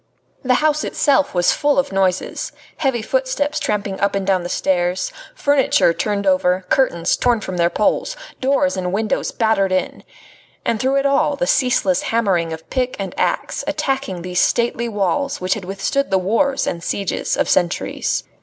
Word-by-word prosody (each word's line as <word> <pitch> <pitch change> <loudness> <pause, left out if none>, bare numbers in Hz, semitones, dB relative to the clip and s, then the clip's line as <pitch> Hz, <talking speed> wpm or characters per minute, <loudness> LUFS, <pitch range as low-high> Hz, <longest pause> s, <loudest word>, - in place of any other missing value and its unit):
The 255 -1 +2
house 305 +1 +1
itself 285 -4 +1
was 175 0 +4
full 290 -1 +1
of 275 - +1
noises; 190 -1 -1 0.2
heavy 265 -7 0
footsteps - - -1
tramping 200 -2 -2
up 200 0 +1
and 195 -1 -1
down 190 -2 +2
the 175 - -5
stairs, 180 0 0 0.2
furniture 285 - +3
turned 200 +2 -2
over, 185 -1 +2
curtains 175 -11 +2
torn 240 -2 +2
from 185 -3 -5
their 170 0 +3
poles, 215 - 0 0.2
doors 275 +1 +1
and 180 -1 -2
windows 215 +3 -1
battered 220 -4 +1
in. 185 - -1 0.6
And 225 - 0
through 265 +3 +1
it 275 0 +1
all 280 +1 +2
the 265 -1 -1
ceaseless 250 -10 +2
hammering 190 -8 0
of 160 0 -7
pick 255 -1 -1
and 195 -3 -5
axe, - - -1
attacking 265 -11 -2
these 180 0 -1
stately 235 0 +1
walls 225 +7 -1
which 185 0 0
had 205 -4 -6
withstood 195 +9 -1
the 190 - +3
wars 230 +9 +1
and 170 -1 -3
sieges 200 +1 -2
of - - +1
centuries. 175 -1 0
210 Hz, 170 wpm, -19 LUFS, 185-270 Hz, 0.6 s, was